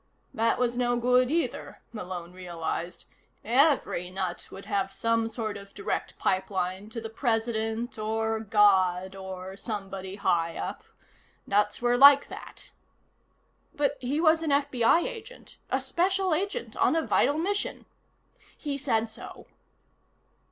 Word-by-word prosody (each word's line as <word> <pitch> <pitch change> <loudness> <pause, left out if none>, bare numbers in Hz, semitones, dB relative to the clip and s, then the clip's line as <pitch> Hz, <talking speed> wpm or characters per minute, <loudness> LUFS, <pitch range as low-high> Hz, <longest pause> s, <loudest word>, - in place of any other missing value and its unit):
That 230 -2 +2
was 245 0 0
no 245 -1 +2
good, 250 +1 +3
either, 330 +3 -2
Malone 180 -4 -6
realized. 175 -1 -5 0.4
Every 250 - +3
nut 185 -1 -4
would 195 - -10
have 195 -1 -1
some 230 +1 0
sort 220 -2 -4
of 200 0 -13
direct 200 - -3
pipeline 190 +1 -1
to 230 - -6
the 225 - -5
President, 225 -1 -1
or 220 +1 -1
God, 190 -3 +3
or 190 0 -7
somebody 195 -3 -5
high 170 -4 0
up. 90 - -4 0.6
Nuts 210 +3 +1
were 245 0 +3
like 280 0 +8
that. - - -10 1.0
But 285 -1 0
he 265 +4 -1
was 320 -1 +4
an 320 - -1
FBI 280 +2 +3
Agent. - - -8
A - - +1
special 375 0 +1
agent 400 +8 -2
on - - +3
a 325 - +1
vital 290 - +2
mission. 400 +5 -2 0.7
He 285 -2 -4
said 230 -5 +1
so. 220 - -11
225 Hz, 130 wpm, -28 LUFS, 195-275 Hz, 1.0 s, like